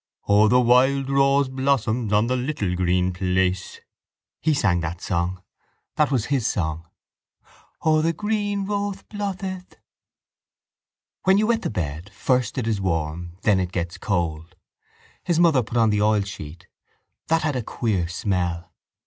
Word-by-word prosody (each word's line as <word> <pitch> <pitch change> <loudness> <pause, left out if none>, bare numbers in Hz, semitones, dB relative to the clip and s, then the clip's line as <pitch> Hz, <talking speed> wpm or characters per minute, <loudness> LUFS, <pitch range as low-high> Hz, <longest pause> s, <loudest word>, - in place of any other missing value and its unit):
O, 105 +1 +5
the 125 +3 +5
wild 130 +3 +3
rose 135 0 +3
blossoms 130 -4 0
On 105 +2 +3
the 125 +2 0
little 125 -8 -2
green 90 0 +1
place. 95 0 -1 0.6
He 155 -1 +2
sang 95 -9 +2
that 85 +1 -4
song. 90 +1 -2 0.5
That 150 -2 +2
was 125 -5 0
his 130 -5 +1
song. 80 -2 -2 1.0
O, 155 -1 +3
the 165 +1 +2
green 205 +1 -1
wothe 200 -1 -3
botheth. 190 -3 -5 1.5
When 190 +1 +5
you 215 - +3
wet 230 0 +1
the - - -2
bed, 85 -2 -4
first 125 +6 0
it 125 - -1
is 110 -3 -1
warm 85 -1 -2
then 105 -3 +3
it 90 -1 -2
gets 90 +1 -4
cold. 85 -3 -2 0.7
His 170 -2 +1
mother 165 -7 +5
put 115 +1 -4
on 110 -2 +4
the 105 0 +1
oilsheet. 100 -7 -1 0.6
That 165 -1 +2
had 155 -1 0
the 125 - -1
queer 105 -6 -1
smell. 90 -2 -2
110 Hz, 150 wpm, -23 LUFS, 90-140 Hz, 1.5 s, O